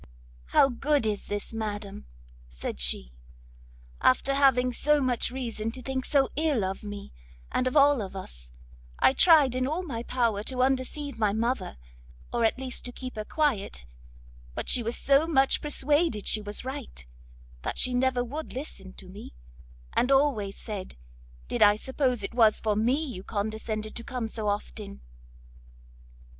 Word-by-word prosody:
"How 270 - +5
good 280 +1 +1
is 210 -2 -2
this, 205 +2 -4
madam," 205 - -5 0.4
said 60 +1 -6
she, - - -1 0.9
"after 275 - +3
having 255 -3 +4
so 300 +4 +3
much 255 -4 0
reason 235 -4 -4
to 255 - -6
think 260 +1 -3
so 275 -3 +2
ill 295 -8 +1
of 190 +1 -4
me 205 -1 -8 0.4
and 255 - +1
of 255 - +1
all 285 -3 +5
of 195 -1 -6
us - - -9 0.5
I - - +5
tried 290 -5 +6
all 315 +5 -1
in 365 - -8
my 230 -5 -4
power 235 -4 0
to 255 0 0
undeceive 265 0 -1
my 210 -3 +2
mother, 225 - -1 0.6
or 235 - +1
at 225 - +2
least 260 -1 -2
to 245 - -3
keep 255 +1 -8
her 215 - -3
quiet; 210 - -1 0.7
but - - -3
she 250 - +4
was 230 +1 -2
so 280 +3 +3
much 270 -4 +3
persuaded 295 - +1
she 215 - +2
was 210 +3 -5
right, 260 - -6 0.6
that - - -4
she 255 - +4
never 250 0 +2
would 295 +6 -6
listen 200 -9 -8
to 190 - -11
me, 185 - -11 0.6
and 250 +3 +2
always 270 -8 +2
said, 205 -4 -7 0.5
did - - -3
I 205 -1 +7
suppose 255 0 -1
it 200 - -3
was 225 -3 +4
for 215 -2 0
me 250 +9 +2
you 240 -10 -6
condescended 215 +1 -3
to 235 - -5
come 245 -1 -3
so 220 -1 -4
often?" 65 - -4
240 Hz, 165 wpm, -27 LUFS, 210-270 Hz, 0.9 s, I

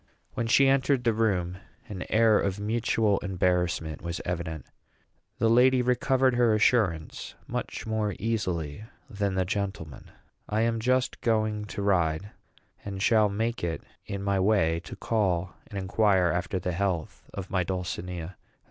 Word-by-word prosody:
When 115 - -2
she 135 +4 +5
entered 135 -1 +2
the 115 -2 +2
room, 95 -5 0 0.3
an 95 -3 -6
air 110 -1 +4
of 100 0 -1
mutual 110 -1 +1
embarrassment 90 -4 -1
was 85 0 -4
evident. 80 -3 -4 0.7
The 115 - +2
lady 125 +2 +5
recovered 130 +1 +2
her 120 -3 +3
assurance 105 -8 +1
much - - -4
more 110 -2 -1
easily 95 -7 -2 0.2
than 100 -5 -2
the 95 -1 +1
gentleman. 95 -6 -4 0.4
I 110 +1 +1
am 115 0 +1
just 125 +2 0
going 110 -2 0
to 100 -1 -5
ride, 95 0 +1 0.5
and 100 -1 -5
shall 105 +1 +4
make 115 +3 -2
it 85 -1 -2 0.2
in 100 0 -4
my 100 -1 +1
way 95 -5 +2
to - - -8
call 95 -5 0
and 100 - -7
inquire 95 -2 +2
after 90 +2 -2
the 90 0 -2
health 90 -2 -3
of 95 -2 -6
my 95 -1 +1
dulcinea. 90 -1 -4
100 Hz, 150 wpm, -27 LUFS, 90-115 Hz, 0.7 s, she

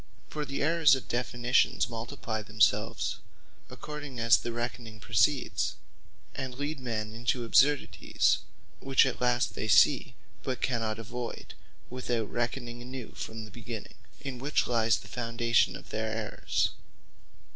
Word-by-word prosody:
For 150 -1 -3
the 140 0 -2
errours 160 -2 +5
of 130 - -7
Definitions 120 +1 +1
multiply 115 -1 -4
themselves, 105 0 +1 0.5
according 140 +1 -7
as 115 0 +6
the 120 - -2
reckoning 120 -2 -5
proceeds; - - +1 0.6
and 130 -2 -5
lead 145 +1 -3
men 110 -4 -3
into 120 +1 0
absurdities, 145 +5 +3 0.4
which 135 0 +4
at 130 - -2
last 125 0 +2
they 110 - -3
see, 105 - +5 0.3
but 130 -1 -3
cannot 115 -4 -1
avoyd, 115 +2 -6 0.4
without 120 -4 -2
reckoning 120 0 -3
anew 125 -1 -7
from 110 0 -6
the 105 - -13
beginning; 115 -2 -7 0.3
in 135 -3 -5
which 140 +4 +1
lyes 115 -2 +3
the - - -13
foundation 115 -4 +1
of - - -11
their 110 0 -2
errours. 110 -1 -1
120 Hz, 135 wpm, -30 LUFS, 115-130 Hz, 0.6 s, as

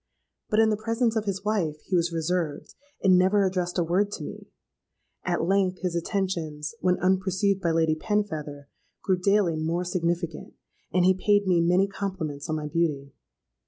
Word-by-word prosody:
But 215 - +2
in 220 -1 +5
the 210 - 0
presence 230 +1 +1
of 220 -1 0
his 195 0 -3
wife, 175 -8 0
he 190 - -1
was 170 0 +2
reserved, 165 -2 -2 0.3
and 185 -2 +6
never 195 +2 +3
addressed 180 -1 -1
a 175 - +3
word 190 +5 +1
to - - -5
me. - - -8 0.8
At 175 -2 0
length 190 0 +1
his 180 -2 -1
attentions, 170 -4 -2
when 180 0 +2
unperceived 190 +1 +1
by 170 - +1
Lady 160 -1 +2
Penfeather, 155 -6 -3 0.4
grew 185 -2 +1
daily 195 -3 +2
more 165 +3 -1
significant; 170 -2 -2 0.4
and 180 0 +3
he 185 - +6
paid 205 +2 +2
me 180 -3 +3
many 180 +3 +3
compliments 185 -8 -5
on 155 - 0
my 155 -1 -4
beauty. 150 -3 -1
180 Hz, 170 wpm, -26 LUFS, 165-195 Hz, 0.8 s, and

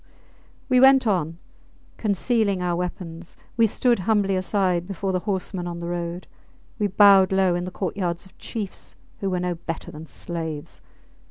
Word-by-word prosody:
We 255 -2 +4
went 265 0 +7
on. 170 -6 0 0.6
Concealing 210 -1 +1
our 180 -1 0
weapons, 175 -1 -6 0.2
we 230 -1 +4
stood 240 +2 +2
humbly 200 0 +1
aside 185 -2 0
before 195 0 -3
the 185 - 0
horsemen 185 -2 -2
on 170 -1 -5
the 170 - -6
road; 175 0 -4 0.5
we 210 - +2
bowed 195 -1 +6
low 190 -2 +3
in 175 0 -2
the - - -4
courtyards 180 -2 -3
of 190 - -19
chiefs 210 -4 -6 0.2
who 195 - -1
were 180 -1 -1
no 180 0 -1
better 165 -1 -6
than 155 +2 -10
slaves. 160 -2 -6
185 Hz, 160 wpm, -24 LUFS, 175-200 Hz, 0.6 s, went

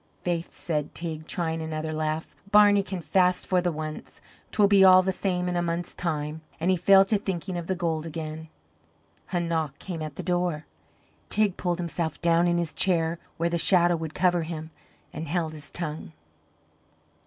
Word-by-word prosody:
"Faith," 170 -1 -2
said 150 -4 -3
Teig, 160 -2 -5
trying 165 -2 -2
another 160 0 -3
laugh, 155 0 -3
"Barney 205 -1 +6
can 190 -2 -5
fast 180 +3 +2
for 185 -1 +2
the 175 0 0
once; 155 -1 -7 0.3
'twill 205 -2 +4
be 200 -1 +6
all 185 0 +8
the 190 - +1
same 180 -1 -1
in 180 - -1
a 175 - +1
month's 170 0 -3
time." 155 -2 -3 0.2
And 175 +3 +2
he - - +4
fell 195 +2 +6
to 205 +1 +1
thinking 190 -2 -4
of 170 -1 -4
the 190 - 0
gold 165 -2 -2
again. 160 0 -6 0.8
A 180 - +1
knock 160 -4 -2
came 175 -4 -6
at 155 -2 -5
the - - -6
door. 175 -4 -1 0.6
Teig 210 -3 +2
pulled 175 -2 -1
himself 170 -3 -3
down 170 +1 +3
in 175 0 +2
his 170 -2 -2
chair 170 -2 +1 0.2
where 170 - +1
the 170 0 -1
shadow 175 -1 +4
would 160 -1 -5
cover 175 -2 +2
him, 160 -1 -6 0.4
and 160 +2 -5
held 160 0 -1
his 150 -2 -9
tongue. 155 - -5
170 Hz, 185 wpm, -26 LUFS, 160-180 Hz, 0.8 s, all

